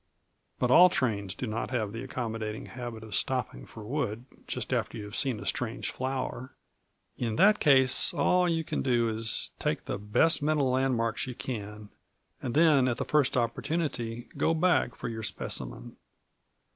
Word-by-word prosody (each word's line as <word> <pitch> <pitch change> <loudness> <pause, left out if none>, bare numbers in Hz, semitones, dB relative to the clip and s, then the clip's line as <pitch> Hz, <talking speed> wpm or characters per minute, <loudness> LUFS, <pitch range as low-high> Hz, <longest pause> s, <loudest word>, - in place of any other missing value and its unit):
But 125 - 0
all 180 +7 +8
trains 105 - -1
do - - -4
not 110 0 -3
have 110 -5 -2
the 115 +2 -6
accommodating 115 -4 -4
habit 120 -3 -7
of 110 -2 -9
stopping 130 -3 -1
for 110 - -11
wood 120 -3 -3 0.2
just - - -3
after - - -1
you 105 - -6
have 105 +1 -8
seen 130 -6 0
a 100 - -8
strange 125 +3 -2
flower; 130 0 -4 0.6
in 115 -3 -1
that 210 - +5
case, 130 -4 +6
all 180 +5 +2
that 175 - +1
you 165 -1 0
can - - -3
do 120 -3 +2
is, 110 0 0
take - - -2
the - - -4
best 145 +10 +2
mental 145 -3 +1
landmarks 125 -2 0
you 125 - -6
can, 105 -4 -6 0.5
and 125 -1 -4
then 150 -5 +5
at 120 - 0
the - - -2
first 145 -4 +2
opportunity 120 -1 -2
go 165 - +2
back 175 -6 +2
for - - -6
your 110 -1 -5
specimen. 105 - -4
125 Hz, 170 wpm, -29 LUFS, 110-140 Hz, 0.6 s, all